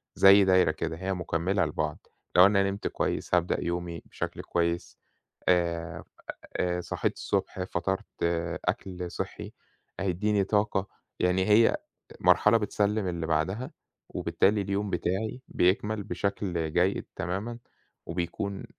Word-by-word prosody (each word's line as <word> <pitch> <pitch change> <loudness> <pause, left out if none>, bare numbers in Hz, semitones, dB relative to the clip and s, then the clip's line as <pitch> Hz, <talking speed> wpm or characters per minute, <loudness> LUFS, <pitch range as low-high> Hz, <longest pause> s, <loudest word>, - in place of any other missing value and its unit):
زي 95 0 +8
دايرة 95 -4 +5
كده، 80 +1 -4
هي 95 +2 -2
مكمِّلة 90 +2 0
لبعض. 75 0 -3 0.3
لو 90 - +9
أنا 100 -1 +4
نِمت 100 +1 -2
كويس، - - -1
هابدأ 90 0 +1
يومي 85 -1 -3
بشكل - - -5
كويس. 85 0 -1 0.5
آآ، 85 -2 +1 0.5
آآ، 90 0 0
صِحيت - - -1
الصبح، 90 - -2
فطِرت، 95 +1 -2 0.6
أكل 90 -2 -3
صحي - - -5 0.5
هيدِّيني 100 +2 +1
طاقة. 100 -1 +1 0.3
يعني، 90 +1 +2
هي 110 +2 +6 0.4
مرحلة 105 +2 +5
بتسلِّم 105 0 0
اللي 85 -2 -2
بعدها، 90 +11 -1 0.4
وبالتالي 105 +1 +1
اليوم 100 +1 -2
بتاعي 95 +7 -2
بيكمل 105 +3 +1
بشكل 90 -6 -2
جيد 90 +2 +1
تمامًا، 100 +8 -3 0.5
وبيكون 90 +3 -3
95 Hz, 120 wpm, -28 LUFS, 85-100 Hz, 0.6 s, لو